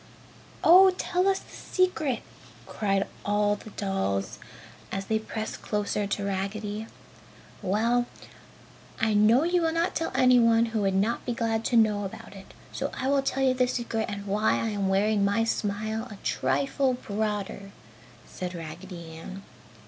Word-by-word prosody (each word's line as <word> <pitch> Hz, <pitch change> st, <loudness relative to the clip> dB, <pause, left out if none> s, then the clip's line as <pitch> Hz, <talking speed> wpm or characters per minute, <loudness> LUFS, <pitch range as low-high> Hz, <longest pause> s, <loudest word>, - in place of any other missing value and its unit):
"Oh 370 Hz, +3 st, +8 dB
tell 365 Hz, 0 st, 0 dB
us 390 Hz, -1 st, +3 dB
the -, -, -13 dB
secret!" 325 Hz, -9 st, 0 dB, 0.4 s
cried 195 Hz, -2 st, 0 dB, 0.2 s
all 205 Hz, 0 st, +2 dB
the 210 Hz, -, -11 dB
dolls, 190 Hz, -, -2 dB, 0.5 s
as 195 Hz, 0 st, -3 dB
they 220 Hz, +2 st, +1 dB
pressed 220 Hz, 0 st, -5 dB
closer 210 Hz, -1 st, -1 dB
to 200 Hz, 0 st, -2 dB
Raggedy. 205 Hz, +2 st, -3 dB, 0.7 s
"Well, 235 Hz, +5 st, +1 dB, 0.9 s
I 225 Hz, -1 st, +2 dB
know 215 Hz, +6 st, +5 dB
you 350 Hz, +1 st, +2 dB
will 325 Hz, -1 st, +2 dB
not 335 Hz, +2 st, 0 dB
tell 325 Hz, -, -2 dB
anyone 235 Hz, -2 st, +5 dB
who 220 Hz, -, +1 dB
would 195 Hz, -1 st, +1 dB
not 210 Hz, +5 st, +1 dB
be 245 Hz, -, -2 dB
glad 225 Hz, -1 st, -1 dB
to 240 Hz, -, +2 dB
know 210 Hz, -2 st, +3 dB
about 195 Hz, 0 st, -8 dB
it, 195 Hz, 0 st, -13 dB, 0.2 s
so -, -, -3 dB
I 260 Hz, 0 st, 0 dB
will 280 Hz, 0 st, +3 dB
tell 270 Hz, 0 st, -1 dB
you 260 Hz, -1 st, +4 dB
the 250 Hz, -1 st, +2 dB
secret 235 Hz, -3 st, -2 dB
and 200 Hz, 0 st, -5 dB
why 205 Hz, +2 st, +2 dB
I 225 Hz, -, 0 dB
am 200 Hz, -2 st, -1 dB
wearing 200 Hz, +2 st, +2 dB
my 200 Hz, +3 st, +2 dB
smile 215 Hz, 0 st, -2 dB
a 210 Hz, -, -9 dB
trifle 135 Hz, -, +1 dB
broader!" 205 Hz, -3 st, -3 dB, 0.6 s
said 180 Hz, 0 st, -6 dB
Raggedy 170 Hz, +1 st, -8 dB
Ann. 190 Hz, +4 st, -9 dB
215 Hz, 155 wpm, -27 LUFS, 195-240 Hz, 0.9 s, Oh